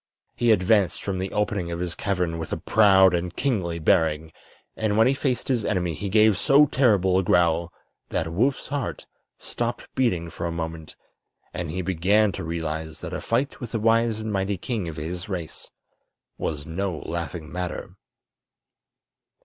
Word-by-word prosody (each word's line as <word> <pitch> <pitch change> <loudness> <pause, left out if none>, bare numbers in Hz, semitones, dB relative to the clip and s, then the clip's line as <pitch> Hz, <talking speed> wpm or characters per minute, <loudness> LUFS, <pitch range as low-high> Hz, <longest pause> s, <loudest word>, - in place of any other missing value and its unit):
He 120 -1 +3
advanced 95 -3 +2
from 95 -2 -2
the 95 +1 -3
opening 105 -4 -1
of 85 - -3
his 90 -1 -2
cavern 90 -4 -1
with 80 - -6
a - - -1
proud 95 -4 +5
and 85 0 -2
kingly 95 -12 -1
bearing, 80 -1 +1 0.4
and 110 -1 0
when 110 - +6
he 130 - +4
faced 130 -2 -1
his 125 -5 +1
enemy 90 -5 0
he 100 +7 -4
gave 110 -1 +4
so 145 +1 +6
terrible 100 -10 +3
a - - 0
growl 85 -1 +2 0.4
that 80 +1 -2
Woof's 130 +9 0
heart 130 - -3 0.3
stopped 120 0 -4
beating 90 -11 0
for 85 +2 -4
a - - -3
moment, 80 -1 -6 0.6
and 85 -2 -4
he 90 +4 -3
began 95 +4 +2
to - - -6
realize 80 -1 -4
that - - -6
a - - -3
fight 130 +5 -1
with 120 -3 -7
the 115 - 0
wise 115 0 +2
and 110 -1 -4
mighty 95 0 -1
king 105 -1 -3
of 80 - -8
his 85 +5 -5
race 90 -5 -6 0.7
was 75 -2 -4
no 90 +1 -3
laughing 85 -1 -5
matter. 90 0 -5
95 Hz, 170 wpm, -25 LUFS, 85-110 Hz, 0.7 s, when